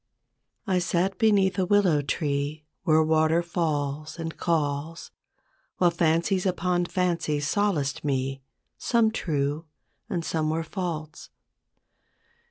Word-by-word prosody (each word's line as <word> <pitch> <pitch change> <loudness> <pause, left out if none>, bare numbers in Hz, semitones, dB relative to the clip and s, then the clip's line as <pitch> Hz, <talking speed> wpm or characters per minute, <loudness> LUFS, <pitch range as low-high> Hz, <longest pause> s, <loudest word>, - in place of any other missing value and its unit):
T 185 -2 +2
SAT 180 +2 0
beneath 195 -4 +3
a 185 - +2
willow 185 -7 +4
tree, 145 +1 -2 0.2
Where 155 0 +5
water 160 +2 +3
falls 155 -3 -2
and 165 -1 -5
calls; 155 -1 -2 0.7
While 175 -1 +4
fancies 170 +3 +1
upon 180 -1 0
fancies 170 -5 -1
solaced 170 -7 0
me, 135 -1 -1 0.4
Some 230 -2 +2
true, 150 -5 -2 0.4
and 175 -6 -2
some 155 -1 -1
were 160 +1 -1
false. 160 -3 -5
165 Hz, 110 wpm, -26 LUFS, 150-180 Hz, 0.7 s, Where